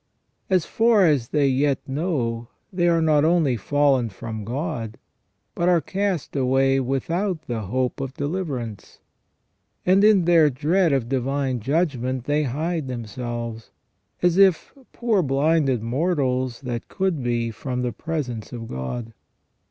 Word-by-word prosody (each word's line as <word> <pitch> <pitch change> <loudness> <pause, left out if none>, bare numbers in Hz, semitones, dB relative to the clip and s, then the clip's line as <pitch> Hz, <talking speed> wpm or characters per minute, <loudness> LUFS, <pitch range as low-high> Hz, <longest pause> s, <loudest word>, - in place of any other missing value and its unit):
As 185 -4 +2
far 225 -4 +3
as 145 -8 +2
they 145 0 +2
yet 135 +1 +2
know 135 -6 -2 0.3
they 175 -1 +2
are 165 -1 +3
not 150 -2 +3
only 160 -5 +3
fallen 135 +1 +2
from 110 +1 -7
God, 115 -2 -4 0.6
but 175 +1 +1
are 175 -1 +4
cast 195 -2 -2
away 135 0 +2
without 160 +7 -1
the 120 -7 -3
hope 130 +6 -1
of 135 0 -5
deliverance; 145 - -4 0.9
and 190 +2 +4
in 210 -5 +5
their 165 -3 +5
dread 160 +6 +1
of 135 -4 0
divine 135 0 -1
judgment 130 - -1
they 145 +3 +1
hide 155 +3 -2
themselves, 120 -1 -5 0.5
as 175 0 +3
if, 190 -4 +4 0.2
poor 225 -5 +1
blinded 140 -3 +1
mortals, 130 -2 -1
that 120 -2 -5
could 190 -7 -1
be, 120 -1 -1
from 125 +2 -4
the 120 -2 -2
presence 125 -6 -4
of 115 -2 -7
God. 110 - -5
135 Hz, 135 wpm, -23 LUFS, 120-165 Hz, 0.9 s, in